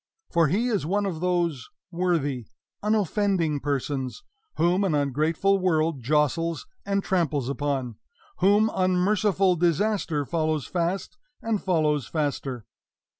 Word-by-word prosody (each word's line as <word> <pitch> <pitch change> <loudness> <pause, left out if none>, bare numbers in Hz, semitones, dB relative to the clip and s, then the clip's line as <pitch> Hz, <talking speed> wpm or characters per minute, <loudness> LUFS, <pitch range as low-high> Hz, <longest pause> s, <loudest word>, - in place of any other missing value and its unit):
For 170 -2 +4
he 210 - +1
is 210 -5 0
one 200 +6 0
of 175 -5 -3
those 170 -7 -1 0.2
worthy, 160 - -1 0.3
unoffending 200 -6 +1
persons 140 - -3 0.3
whom 175 +4 +2
an 180 -6 +1
ungrateful 155 +8 +1
world 160 -5 +1
jostles 150 +5 0 0.2
and 200 0 0
tramples 150 -8 0
upon 140 -4 -2 0.4
whom 205 +3 +4
unmerciful 185 +1 +2
disaster 175 -3 +1
follows 155 -1 -1
fast 180 - -2 0.2
and 225 -3 0
follows 155 -7 +1
faster. 140 -6 -3
170 Hz, 115 wpm, -25 LUFS, 145-190 Hz, 0.4 s, For